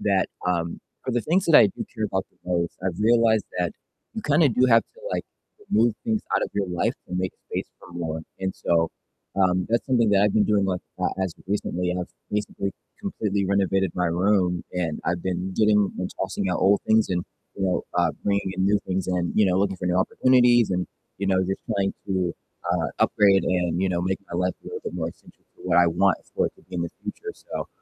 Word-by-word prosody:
that, 100 -2 +2 0.2
um 85 -2 -1 0.2
for 130 - -2
the 120 - +1
things 180 +8 +1
that 165 - +3
I - - +9
do 95 - -5
care 110 - -2
about 95 -2 -1
the - - -35
most, 85 -1 0
I've 90 -2 -2
realized 110 -1 +4 0.2
that 90 -1 0 0.4
you 220 - -3
kind 155 0 +3
of 135 -7 +4
do 125 - +5
have 115 -2 +6
to, - - -22
like, - - -1 0.5
remove 115 -1 +3
things 220 -2 +1
out - - +2
of - - -1
your 100 -1 -1
life 90 -1 0
to 90 - -5
make 90 0 0 0.2
space - - -3
for 90 - -14
more, 80 -2 -3 0.2
and 95 0 -1
so 85 -1 +1 0.5
um, 90 -1 +2
that's 115 - +1
something 120 -4 +3
that 100 -1 +4
I've 105 -1 +2
been 105 - +5
doing 105 -2 +2
like, 90 -2 -1 0.2
uh, - - +2
as 95 -2 -1
of - - -19
recently, 90 -3 -1
and 90 - -1
I've 90 - -6 0.2
basically 105 -1 -2 0.3
completely 105 - -1
renovated 95 -2 +1
my 90 -1 +1
room, 90 0 +1
and 85 -4 -2
I've 85 0 -1
been 95 0 -2
getting 105 -1 +3
and 90 - -2
tossing 95 -2 -2
out - - 0
old 100 +1 +4
things 110 0 +4
and, 90 -1 0 0.3
you 95 - -5
know, 90 -1 0
uh, - - +4 0.2
bringing 100 -2 0
in 95 - +1
new 100 +1 +4
things 95 0 -1
and, 90 -1 0
you 105 -2 +5
know, 90 0 +2
looking 95 -1 +1
for 90 - -4
new 90 0 +1
opportunities 120 +2 +4
and, 90 0 0 0.3
you 100 - -2
know, 95 -1 +3
just 95 +1 -2
trying 100 -1 0
to, 95 -3 0 0.4
uh, 85 -2 0
upgrade 100 -2 +4
and, 90 -1 0
you 95 - +2
know, 85 -2 0
make 95 +1 0
my 85 - -3
life 90 0 +1
a - - -29
little - - -5
bit - - -5
more 80 -2 -2
essential - - -20
for - - -18
what - - +3
I 85 - +6
want 95 +3 +3 0.2
for - - +2
it - - -5
to - - -21
be 95 - -13
in 85 - 0
the 85 - -3
future, 430 0 -6
so, - - -6
95 Hz, 235 wpm, -25 LUFS, 90-105 Hz, 0.5 s, I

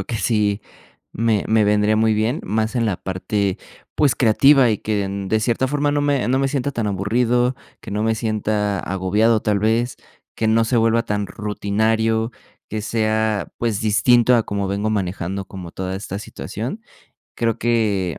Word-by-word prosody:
creo - - -4
que 120 - -3
sí, 105 -2 +1 0.5
me 115 -2 +1
me 110 -1 +3
vendría 105 +1 +3
muy 110 0 +3
bien, 110 +8 0
más 110 +2 -1
en 115 -2 +1
la 100 - 0
parte, 95 +1 -2 0.4
pues, 145 -5 +3
creativa 130 +2 +5
y 105 - 0
que 105 -2 -1
de 100 +2 -1
cierta 120 +3 0
forma 145 +1 0
no 145 - +1
me 145 -2 +1
no 130 +1 +2
me 135 0 +1
sienta 140 0 -1
tan 115 -4 -2
aburrido, 120 +6 +1 0.3
que - - -10
no 105 +1 -1
me 110 0 +1
sienta 105 -2 -1
agobiado, 105 +4 +1
tal 105 -1 +1
vez, 115 +4 0 0.4
que 110 - 0
no 115 +1 +3
se 120 +2 0
vuelva 115 +1 +3
tan 105 -1 -2
rutinario, 110 +3 0 0.4
que 110 - -3
sea, 110 -1 -1
pues, 115 -4 -1
distinto 120 +3 +4
a 115 - +3
como 100 -2 -3
vengo 100 +2 -1
manejando 95 -1 -2
como 90 -2 -9
toda 95 +1 -4
esta 95 0 -5
situación. 115 - -6 0.5
Creo 115 -1 -1
que 105 -7 0
110 Hz, 175 wpm, -21 LUFS, 100-115 Hz, 0.5 s, creativa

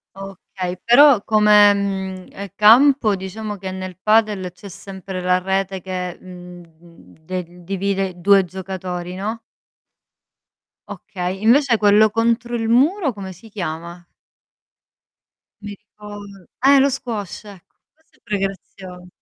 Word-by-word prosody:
Okay, 190 -1 -7
però 250 -2 +6
come, 210 -1 +5
mhmm, 190 -2 -4
ehm, 200 +1 -7
campo, 230 +1 +5
diciamo, 205 +3 -6
che 190 -1 -7
nel 185 -1 -7
padel 210 -4 +1
c'è 190 +3 -13
sempre 190 0 -8
la 180 0 +2
rete 190 0 -2
che, 180 -1 -5
mhmm, 180 -1 -12 0.2
mhmm, 170 0 -19
di 180 0 -7
divide 195 0 -3
2 195 +2 +4
giocatori, 180 -1 -6
no? 215 +4 -4 1.5
Okay, 185 0 -6
invece 240 +2 +3
quello 210 +1 +4
contro 235 +2 -1
il 225 -1 -2
muro 280 - +2
come 195 -2 -8
si 195 +6 -16
chiama? 170 -3 -6 1.6
Mi 205 0 -7
ricor 210 0 -12 0.4
eh, 280 0 +6
lo 275 +1 +3
squash 230 -9 -5
ec 195 -4 -13 0.3
questo 315 +1 -34
è - - -34
pure 210 -2 -2
grazio 190 -2 -7
195 Hz, 130 wpm, -20 LUFS, 185-215 Hz, 1.6 s, però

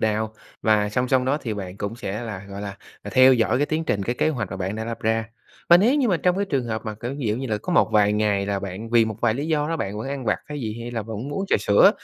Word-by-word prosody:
nào, 110 0 0 0.3
và 105 -2 +3
song 125 +4 -1
song 130 -1 +3
đó 140 +3 +1
thì 115 -4 -3
bạn 95 -2 -6
cũng 100 +3 -4
sẽ 105 +1 -4
là, 105 -4 -6
gọi 100 0 -7
là, 100 -1 -6 0.3
ờ, - - -7
theo 130 0 +8
dõi 115 +1 +2
cái 145 - +2
tiến 160 +2 -1
trình, 100 -7 0
cái 120 +5 -1
kế 155 - +1
hoạch 120 -11 -2
mà - - -4
bạn 95 +2 -3
đã 110 - -3
lập 115 0 -5
ra. 110 0 +1 0.4
Và 175 - +9
nếu 225 +10 +4
như 270 -6 +2
mà 180 - +3
trong 180 +2 +1
cái 200 - +1
trường 135 -9 -1
hợp 110 -2 -3
mà, 110 -1 -4
kiểu, 120 +5 -5
ví 130 - -2
dụ 105 - +1
như 135 +1 -4
là 105 -2 -1
có 180 - -4
một 170 - +4
vài 105 -1 +4
ngày 105 -2 +1
là 100 -1 -1
bạn, 100 +4 -6
vì 115 -1 +5
một 110 -2 -4
vài 115 -2 +2
lý 145 +4 -3
do 150 -1 0
đó 165 - -1
bạn 105 -7 -3
vẫn 115 - -4
ăn 140 -3 -4
vặt - - +1
hay 150 -1 -5
gì, 110 -1 -4
hay 120 - -5
là 115 -2 -3
vẫn 110 +1 -6
muốn 145 - -5
uống 195 - -1
trà - - +4
sữa, 100 0 +6
115 Hz, 325 wpm, -23 LUFS, 105-135 Hz, 0.4 s, Và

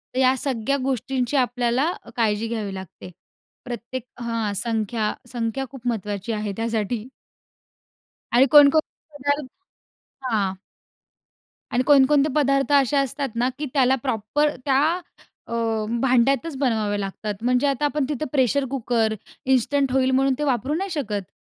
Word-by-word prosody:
तर - - +1
या 260 0 +4
सगळ्या 265 +1 -1
गोष्टींची 260 +1 -1
आपल्याला 245 +3 +1
अ, - - -14
काळजी 220 -1 +1
घ्यावी 215 -4 -3
लागते. 190 -1 -9 0.5
प्रत्येक 245 0 -5 0.2
हां, 230 -3 -2
संख्या 220 0 -1 0.2
संख्या 240 +2 -2
खूप 250 -3 -9
महत्वाची 210 -1 -2
आहे 210 -1 -2
त्यासाठी. 225 0 -2 1.3
आणि 250 +3 +6
कोणकोणते 295 +1 +4
पदार्थ 285 +5 -3 0.6
हां. 200 -5 0 1.2
आणि 245 +1 +2
कोणकोणते 290 +1 +5
पदार्थ 275 -1 +2
असे 280 0 +4
असतात 275 0 -1
ना 245 +2 +1
की 300 - -2
त्याला 265 -1 +4
प्रॉपर 255 +4 +1 0.2
त्या 270 -1 +3 0.7
अ, - - -6 0.5
भांड्यातच 270 +4 +2
बनवावे 220 -6 0
लागतात. 205 +2 -4
म्हणजे 250 +3 +2
आता 280 +1 0
आपण 290 -1 0
तिथं 295 0 -2
प्रेशर 270 0 +2
कुकर, 235 -4 0 0.3
इन्स्टंट 265 +1 +2
होईल 260 0 +2
म्हणून 270 +1 +3
ते - - 0
वापरू 265 0 0
नाही 390 +4 -2
शकत. 205 -7 -4
255 Hz, 135 wpm, -23 LUFS, 225-275 Hz, 1.3 s, आणि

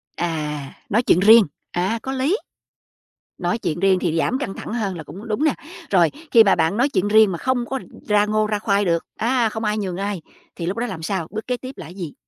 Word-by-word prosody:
À, 150 -4 -3 0.2
nói 230 +5 +2
chuyện 175 - +4
riêng, 220 +3 +8 0.3
à, 190 +6 -1
có 265 - -4
lý. 270 +10 +1 1.0
Nói 175 +5 -1
chuyện 170 -7 -3
riêng 190 -1 +3
thì 165 -2 -1
giảm 255 +10 +1
căng 245 -9 -3
thẳng - - -7
hơn 200 -6 -2
là 160 - -7
cũng 195 +9 -10
đúng 220 +7 -1
nè. 310 - +3 0.4
Rồi 175 -5 +4 0.2
khi 230 -2 +8
mà 195 - +4
bạn 165 +4 +1
nói 260 +4 +3
chuyện 200 -6 0
riêng 215 -1 +5
mà 170 - -3
không 255 +1 0
có 265 +2 -3 0.3
ra 210 0 +4
ngô 215 0 +1
ra 210 -1 -1
khoai 200 -1 +1
được, 170 -1 0
a, 235 0 +1
không 220 +1 -5
ai 210 0 0
nhường 185 -4 -3
ai, 200 -2 -3 0.3
thì 170 - -5
lúc 185 +5 -2
đó 245 +1 -1
làm 185 -5 -6
sao, 185 -2 -2
bước 220 +2 -5
kế 250 - -1
tiếp 255 +1 -8
là - - -8
gì? 175 -4 -7
205 Hz, 240 wpm, -21 LUFS, 175-230 Hz, 1.0 s, riêng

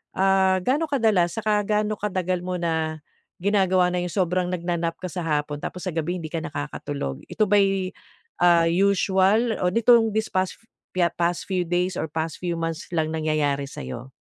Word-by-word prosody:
ah, 190 0 +3
ga'no 290 - +1
kadalas, 220 - +2
saka 215 -1 +1
ga'no 210 0 0
katagal 185 -3 -1
mo 180 +1 -4
na 160 -3 -2 0.4
ginagawa 190 -3 +3
na 180 - 0
'yong 175 -1 -4
sobrang 180 -1 +1
nagna-nap 170 -2 -2
ka 185 - -4
sa 175 -1 -4
hapon 150 -1 -1
tapos 180 +4 -6
sa 185 - -2
gabi 165 +2 -2
hindi 160 -3 -6
ka 165 - -2
nakakatulog? 145 - -5
Ito 215 - 0
ba'y 195 -2 +2 0.5
ah, 175 -1 +5
usual 200 +4 +2
o 180 - +1
nitong 225 +2 +4
this 220 0 -1
past 185 0 0 0.6
past 170 0 +1
few 180 -3 -2
days 180 +1 0
or - - -2
past 160 0 -4
few 175 -1 -2
months 165 -1 -4
lang 155 -1 0
nangyayari 150 -3 0
sa - - -8
'yo? 125 +2 -7
180 Hz, 175 wpm, -24 LUFS, 165-195 Hz, 0.6 s, ah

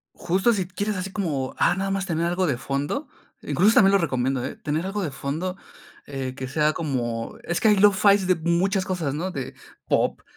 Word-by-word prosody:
Justo 190 +7 +1
si 190 -4 -1
quieres 200 +3 -3
así 185 +1 -4
como, 150 -11 -2
ah, - - +3
nada 195 +1 -2
más 195 0 -1
tener 170 -2 -1
algo 175 +1 0
de 140 - 0
fondo, 140 - -3 0.3
incluso 210 +5 +3
también 195 0 +6
lo 200 - +7
recomiendo, 130 -5 0
¿eh?, - - -4
tener 155 +4 -2
algo 200 +1 -2
de 155 - -3
fondo, 160 +8 -4 0.5
eh, 135 -2 -4
que 130 -1 -5
sea 150 +2 +1
como, 120 -7 -3
es 170 - -1
que - - +2
hay 210 - +6
lo-fi 200 0 +5
de 185 -1 +3
muchas 185 +4 +1
cosas, 175 -8 -2
¿no?, 175 +6 -3
de 135 -6 -5 0.3
pop, - - +1
175 Hz, 205 wpm, -24 LUFS, 140-195 Hz, 0.5 s, lo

